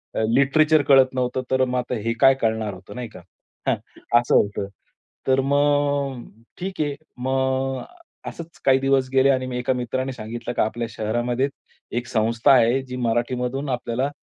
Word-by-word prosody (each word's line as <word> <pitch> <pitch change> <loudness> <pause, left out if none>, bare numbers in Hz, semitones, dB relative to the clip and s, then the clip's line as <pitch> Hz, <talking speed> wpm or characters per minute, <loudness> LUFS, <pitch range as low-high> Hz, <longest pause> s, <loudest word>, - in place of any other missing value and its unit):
अ, - - 0
literature 150 +4 +4
कळत 130 -1 +6
नव्हतं, 130 0 -1
तर 130 0 +3
मग 125 0 -2
आता 125 0 -3
हे 115 - +1
काय 135 - +7
कळणार 110 -2 0
होतं, 95 +2 -12
नाही 125 -2 -5
का? 90 - -12 0.5
हां. - - +3 0.4
असं 120 - +1
होतं. 100 -1 +1 0.6
तर 130 0 +4
मग 145 -2 +1 0.3
ठीक 185 -1 -5
आहे, 145 -2 -1 0.2
मग 130 +1 -1 0.4
असंच 170 0 -9
काही 135 -1 +5
दिवस 135 -1 +1
गेले 135 +1 +5
आणि 130 -1 +2
मला 125 -1 -4
एका 125 +1 0
मित्राने 130 +2 -2
सांगितलं 120 +1 -6
की, - - 0
"आपल्या 115 +2 -1
शहरामध्ये 120 +4 -1 0.5
एक 120 0 -3
संस्था 115 +3 +2
आहे, 125 +1 +4
जी 125 -1 -7
मराठीमधून 125 +3 -1
आपल्याला 125 +2 -1
130 Hz, 165 wpm, -23 LUFS, 120-135 Hz, 0.6 s, काय